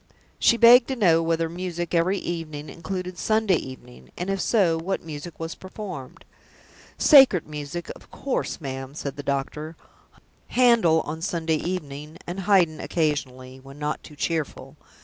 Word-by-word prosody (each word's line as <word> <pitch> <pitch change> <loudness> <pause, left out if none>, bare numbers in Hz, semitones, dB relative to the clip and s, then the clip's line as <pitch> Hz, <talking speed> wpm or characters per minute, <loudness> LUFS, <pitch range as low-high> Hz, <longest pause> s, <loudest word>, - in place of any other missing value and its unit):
She 235 - +4
begged 235 +1 +8
to 265 - -2
know 170 -8 +4
whether 165 0 0
music 175 0 -5
"every 175 +4 +2
evening" 155 -5 -5
included 180 +1 -6
Sunday 215 -4 +2
evening; 65 - -10
and, 180 +2 -2
if 195 -1 -1
so, 180 -8 +2
what 190 +4 -3
music 160 +1 -8
was 165 0 -4
performed? 185 -8 -9 0.7
"Sacred 265 - +7
music, 150 +3 -6
of - - -17
course, 275 - -3
ma'am," 135 -2 -6
said 140 -3 -5
the 145 - -6
doctor. 145 +3 -3 0.7
"Handel 230 -11 +4
on 160 +2 -6
Sunday 165 -2 0
evening 150 -3 -5
and 175 +3 -5
Haydn 185 -5 +3
occasionally, 130 -5 -2
when 135 +1 -13
not 150 0 -3
too 150 - -13
cheerful. 160 -1 -3
165 Hz, 150 wpm, -24 LUFS, 150-185 Hz, 0.7 s, begged